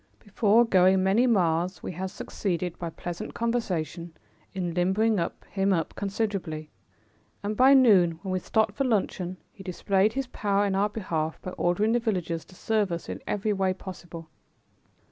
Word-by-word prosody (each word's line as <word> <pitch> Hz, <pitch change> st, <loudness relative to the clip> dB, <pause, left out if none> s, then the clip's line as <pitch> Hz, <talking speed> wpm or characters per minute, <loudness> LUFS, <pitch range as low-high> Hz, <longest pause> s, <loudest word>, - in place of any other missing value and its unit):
Before 215 Hz, +2 st, +3 dB
going 190 Hz, -3 st, +4 dB
many 210 Hz, +7 st, +3 dB
miles 180 Hz, -4 st, +1 dB
we -, -, -4 dB
had 185 Hz, +2 st, -4 dB
succeeded, 180 Hz, -3 st, -3 dB
by 170 Hz, -, -3 dB
pleasant 175 Hz, +1 st, -6 dB
conversation, 175 Hz, -8 st, -2 dB, 0.4 s
in 180 Hz, -3 st, -3 dB
limbering 190 Hz, +5 st, +2 dB, 0.3 s
him 195 Hz, 0 st, +1 dB
up 165 Hz, -3 st, -1 dB
considerably, 195 Hz, -7 st, -3 dB, 0.7 s
and 210 Hz, +1 st, -2 dB
by 265 Hz, +4 st, +6 dB
noon, 200 Hz, -10 st, +6 dB
when 190 Hz, -, -3 dB
we 185 Hz, -, 0 dB
stopped 220 Hz, +2 st, +1 dB
for 245 Hz, -, -1 dB
luncheon, 190 Hz, -6 st, -1 dB, 0.2 s
he -, -, -13 dB
displayed 195 Hz, +3 st, +1 dB
his 270 Hz, 0 st, -2 dB
power 205 Hz, -4 st, 0 dB
in 200 Hz, -, 0 dB
our 200 Hz, +2 st, +2 dB
behalf 165 Hz, -7 st, -3 dB
by 185 Hz, -, -5 dB
ordering 185 Hz, +5 st, +1 dB
the 240 Hz, -, +3 dB
villagers 180 Hz, -8 st, -2 dB
to 185 Hz, -, -17 dB
serve 210 Hz, -1 st, 0 dB
us 170 Hz, 0 st, -4 dB
in -, -, -5 dB
every 210 Hz, +1 st, 0 dB
way 190 Hz, -1 st, 0 dB
possible. 175 Hz, -3 st, -9 dB
190 Hz, 165 wpm, -27 LUFS, 175-215 Hz, 0.7 s, by